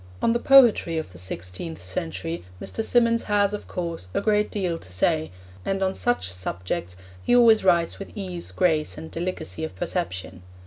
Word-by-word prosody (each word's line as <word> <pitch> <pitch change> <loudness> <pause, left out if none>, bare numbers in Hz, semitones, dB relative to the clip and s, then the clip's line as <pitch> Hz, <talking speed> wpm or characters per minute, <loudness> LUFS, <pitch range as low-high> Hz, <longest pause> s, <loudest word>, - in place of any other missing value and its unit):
On 230 - +2
the 235 - +1
poetry 240 -11 +6
of 160 -12 -4
the 90 - -11
sixteenth 90 - -5
century 85 -1 -4 0.2
Mr. 225 - -2
Symonds 230 0 +3
has, 205 -1 +2
of 210 - -5
course, 170 - -4
a - - +3
great 210 -1 +2
deal 180 -5 -2
to 90 - -13
say, 155 - +1 0.3
and 195 0 -1
on 190 0 +1
such 245 - 0
subjects 90 0 -4 0.3
he 245 - +3
always 230 -4 +6
writes 170 -3 +3
with 200 +3 -9
ease, 180 -4 -5
grace, 160 -5 +1
and 160 - -8
delicacy 165 -2 -4
of 160 - -5
perception. 90 -1 -4
170 Hz, 175 wpm, -25 LUFS, -, 0.3 s, poetry